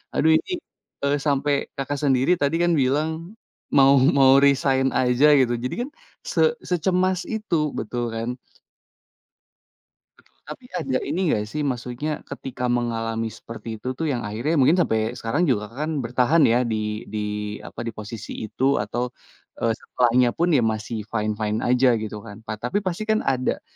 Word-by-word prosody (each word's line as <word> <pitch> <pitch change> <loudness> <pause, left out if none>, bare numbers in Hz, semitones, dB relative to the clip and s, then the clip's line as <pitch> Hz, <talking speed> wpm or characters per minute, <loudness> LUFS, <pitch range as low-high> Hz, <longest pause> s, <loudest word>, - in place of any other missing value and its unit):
aduh 160 - +4
ini, 375 - -6 0.5
eee, 140 0 +2
sampai 145 0 +2 0.2
Kakak 140 +1 -3
sendiri 135 +2 +3
tadi 145 +3 +2
kan 175 - +3
bilang 145 +5 +1 0.7
"Mau 135 0 +7 0.2
mau 135 -1 +7
resign 135 -1 +3
aja," 125 +2 +3
gitu, 125 -2 +2
jadi 125 - -2
kan 255 - -4 0.4
se - - +1 0.3
secemas 185 +1 +1 0.2
itu, 215 -5 -2 0.2
betul 120 +2 -3
kan? 115 +1 -3 1.9
Betul, - - -27 0.2
tapi 260 - -9
ada 135 -7 -1
ini 155 +6 -1
enggak 105 -5 +1
sih, 150 +8 -3
maksudnya 125 +1 -3 0.2
ketika 125 -1 -5
mengalami 115 -2 -1
seperti 115 0 -8
itu 130 +4 -4
tuh 160 +5 -3
yang 120 -5 -2
akhirnya 115 +10 -1
mungkin 135 +4 +5
sampai 110 -6 0
sekarang 140 +10 0
juga 105 -7 0
Kakak 115 - -13
kan - - -2
bertahan 125 +7 +2
ya 120 -2 +5
di 110 -1 -3
di 105 -1 -3 0.4
apa, - - -9
di 115 - -3
posisi 110 0 -7
itu 130 +5 0
atau, 120 +4 -3 0.5
eee, 115 - +2
setelahnya 125 0 +2
pun 170 +1 +1
ya 150 - +4 0.2
masih 110 0 -5
fine-fine 105 0 -2
aja 125 0 +4
gitu 105 -1 -5
kan, 100 +2 -11
ta 110 -1 -6
tapi 125 - -1
pastikan 215 +4 0
ada 130 0 -1
125 Hz, 160 wpm, -23 LUFS, 115-145 Hz, 1.9 s, Mau